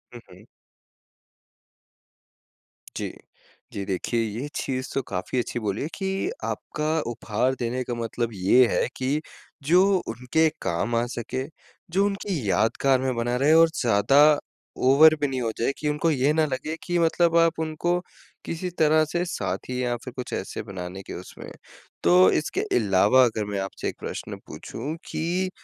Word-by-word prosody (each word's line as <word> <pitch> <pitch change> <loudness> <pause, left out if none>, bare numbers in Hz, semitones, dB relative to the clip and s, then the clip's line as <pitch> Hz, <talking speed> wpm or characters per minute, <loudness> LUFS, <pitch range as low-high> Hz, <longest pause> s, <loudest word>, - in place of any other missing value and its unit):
हुँ, 120 - -9
हुँ। - - -16 2.5
जी। - - -3 0.6
जी, 100 - -3
देखिए 100 +5 -1
ये 115 +6 -3
चीज़ 130 -1 -2
तो 135 - 0
काफ़ी 95 +7 -2
अच्छी 120 +1 -3
बोली 105 -2 -2
है 145 - -2
कि 195 - -2 0.2
आपका 155 +1 -2
उपहार 120 +3 -1
देने 125 +2 -2
का 120 - -4
मतलब 115 0 -2
ये 100 +7 +5
है - - +1
कि 135 +4 0 0.4
जो 175 +6 +5 0.3
उनके 125 +8 +1
काम 115 +8 -1
आ 120 +1 +2
सके, 125 +3 -3 0.5
जो 195 +3 +3
उनकी 195 - -2
यादगार 130 +5 +2
में 130 -1 0
बना 120 +1 -1
रहे 145 +4 +4
और 165 0 +7
ज़्यादा 135 +7 +5 0.5
ओवर 155 +4 +7
भी 145 - +2
नहीं 130 -2 -3
हो 115 -1 -1
जाए 120 - +2
कि 150 - -1
उनको 150 +3 +1
ये 140 +1 +2
ना 160 0 +3
लगे 150 +3 -3
कि 175 -1 -1
मतलब 170 0 +3
आप 165 -1 +3
उनको 160 +3 0 0.5
किसी 175 +2 -3
तरह 155 0 +5
से 175 +3 -1
साथी 125 -7 -3
या 120 -1 0
फिर 125 - -8
कुछ 125 - -6
ऐसे 95 - -4
बनाने 95 -2 -7
के - - -8
उसमें - - -9
हैं। - - -10 0.5
तो 90 +2 +6
इसके - - -1 0.2
अलावा 105 +4 +4
अगर 110 -3 -1
मैं 100 -1 -3
आपसे 95 0 -4
1 - - -8
प्रश्न - - -6
पूछूँ 145 +7 -6 0.2
कि 180 +3 -1
130 Hz, 165 wpm, -25 LUFS, 115-155 Hz, 2.5 s, और